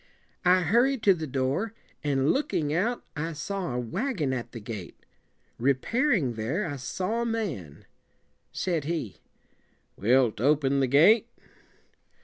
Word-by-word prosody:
"'I 180 +1 +5
hurried 240 - +2
to 195 - +6
the 160 -3 -5
door, 140 - -1 0.3
and, 140 -1 +2
look 295 +2 -1
ing 150 -2 0
out, 225 +9 0
I 160 +2 -3
saw 175 -2 -4
a - - 0
wagon 170 - -2
at 120 -2 -4
the 115 - -7
gate. 105 -5 -8 0.5
Re 135 +3 +3
pair 255 - 0
ing 140 - +2
there, 120 - -2
I 145 -2 -4
saw 185 - -2
a - - -1
man. 165 - -4 0.7
Said 170 -6 -1
he 155 - -3 0.8
"Wilt 120 0 +2
open 140 0 +3
the 135 - +2
gate?" 195 - +5
150 Hz, 145 wpm, -27 LUFS, 130-200 Hz, 0.8 s, to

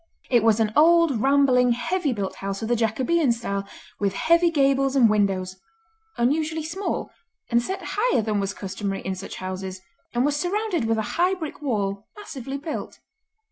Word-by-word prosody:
It 240 -2 +5
was 225 -1 +4
an 215 -1 +1
old 325 -5 +5
rambling, 265 -2 +4
heavy 295 +6 -1
built 200 -5 -4
house 195 +1 -4
of - - -2
the 240 - +2
Jacobean 255 +7 +1
style, 200 -4 -3 0.3
with 200 -1 0
heavy 335 - +3
gables 275 -3 +2
and 250 -4 +6
windows, 195 -3 0 0.6
unusually 310 +6 0
small, 375 +6 -3 0.4
and 235 0 +4
set 380 +10 -4
higher 435 - +1
than 210 -1 0
was 195 0 -2
customary 195 0 -4
in 190 - -3
such 190 +1 -7
houses, 185 0 -5 0.4
and 245 +2 +2
was 290 0 +1
surrounded 360 - -1
with 225 0 +1
a 220 - 0 0.2
high 370 +2 +3
brick 315 -4 -7
wall 200 -7 -2
massively 275 - -6
built. 305 +3 -6
245 Hz, 170 wpm, -24 LUFS, 205-315 Hz, 0.6 s, and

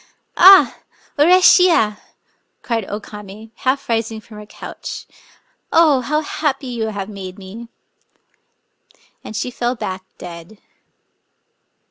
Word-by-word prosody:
" - - -45
Aa! 390 - +6 0.4
urisbiya! 345 - +5 0.3
" - - -46
cried 230 -4 -2
O 205 - -4
Kamc, 210 +1 -11
half 270 +2 -1
rising 225 -1 -2
from 215 0 -14
her 210 0 -11
couch; - - -8 0.2
— - - -31
" - - -48
oh, 310 -5 +4
how 300 +5 -1
happy 290 -3 -2
you 235 -3 -3
have 200 -3 -5
made 190 -3 -9
me!" 205 +5 -10 1.6
And 215 - -9
she 250 - -3
fell 240 +1 -2
back 185 -4 -5
dead. 175 +4 -10
225 Hz, 130 wpm, -19 LUFS, 205-270 Hz, 1.6 s, Aa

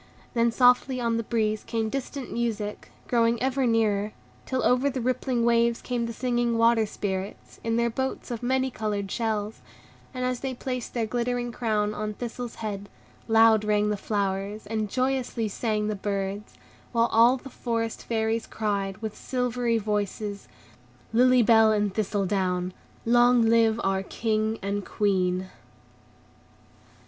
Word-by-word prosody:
Then 235 -1 +3
softly 250 +2 +4
on 230 -1 0
the 230 - -1
breeze 215 -2 0
came 225 -1 -2
distant 275 +2 -5
music, 220 -3 -3 0.2
growing 230 -1 +2
ever 265 0 +1
nearer, 215 -2 +1 0.3
till 260 -1 -1
over 255 +3 +3
the 265 -1 -3
rippling 250 -1 0
waves 235 0 +3
came 240 -2 -2
the - - -4
singing 240 -1 0
Water 230 -1 +4
Spirits, 195 -1 -5
in 230 0 0
their 235 0 +1
boats 265 +1 -3
of 235 - -4
many 260 +1 +1
colored 205 -3 -3
shells; 220 -2 -2 0.5
and 255 -1 -3
as 250 -1 -1
they 265 -1 -4
placed 250 -1 -5
their 230 -2 +1
glittering 240 +1 -1
crown 215 -3 0
on 215 0 -4
Thistle's 240 0 -6
head, 205 -2 -5 0.4
loud 225 -1 +5
rang 210 0 +2
the - - +1
flowers, 200 0 -2
and 215 0 -2
joyously 255 -2 -1
sang 210 0 -1
the 215 - -1
birds, 200 +1 -3 0.4
while 230 0 +3
all 235 +3 +5
the 270 +1 -11
Forest 230 -2 -2
Fairies 225 0 -1
cried, 200 -3 -2
with 215 -1 -4
silvery 245 -2 -1
voices, 205 -1 -3 0.7
"Lily 250 +1 +5
Bell 220 -1 +6
and 205 -2 +1
Thistledown! 190 -3 -1 0.3
Long 240 +1 +5
live 225 0 +4
our 195 0 +1
King 220 +2 -1
and 200 +1 -2
Queen!" 185 -2 0
225 Hz, 145 wpm, -26 LUFS, 210-240 Hz, 0.7 s, Bell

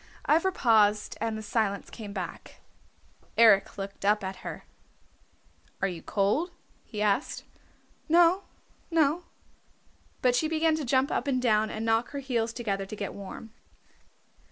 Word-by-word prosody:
Ivra 330 +5 +3
paused 215 - +3
and 225 -1 -1
the 215 - -6
silence 205 -2 -1
came 210 -3 -8
back. 190 -3 -7 0.8
Eric 220 -5 +5
looked 195 0 -7
up 210 +1 +2
at 190 0 -4
her. - - -7 1.2
"Are 195 - +1
you 175 -3 -6
cold?" 210 - 0 0.4
he 210 -1 -3
asked. 210 +6 0 0.7
"No, 345 +3 +5 0.5
no." 325 0 +2 1.0
But 250 -1 +4
she 310 +6 +2
began 320 0 +2
to 305 - -3
jump 260 +2 +2
up - - -1
and 260 -2 +1
down 220 -3 +2
and 220 +1 -4
knock 225 +1 +2
her 280 - -3
heels 235 -4 -1
together 200 -5 -3
to 215 - -6
get 200 -2 -5
warm. 200 +3 -9
225 Hz, 145 wpm, -28 LUFS, 205-280 Hz, 1.2 s, Eric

